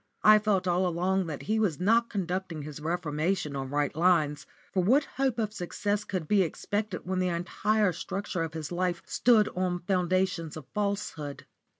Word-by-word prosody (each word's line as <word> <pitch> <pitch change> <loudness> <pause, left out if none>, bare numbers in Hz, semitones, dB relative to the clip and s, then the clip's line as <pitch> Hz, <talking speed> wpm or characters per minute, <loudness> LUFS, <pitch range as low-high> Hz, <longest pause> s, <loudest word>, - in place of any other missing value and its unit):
I 215 0 +8
felt 200 -3 +1
all 180 +1 +2
along 180 +2 0
that 150 -3 -5
he 220 +1 0
was 190 -9 +1
not 230 +5 +3
conducting 185 -5 -3
his 150 0 -7
reformation 160 0 -1
on 135 -1 -4
right 145 +1 0
lines, 160 -4 +2 0.3
for 185 - +2
what 260 +10 +4
hope 265 -3 -1
of 215 -2 -1
success 205 +2 -2
could 185 -7 -4
be 205 +2 +4
expected 205 +3 -2
when 185 +1 -1
the 185 - +1
entire 185 +3 +1
structure 185 +1 -4
of 165 -1 -3
his 155 -1 -5
life 175 -1 -1
stood 225 -4 +4
on 180 -1 -1
foundations 180 -3 0
of 155 - -9
falsehood? 200 -8 -3
185 Hz, 175 wpm, -28 LUFS, 165-205 Hz, 0.3 s, I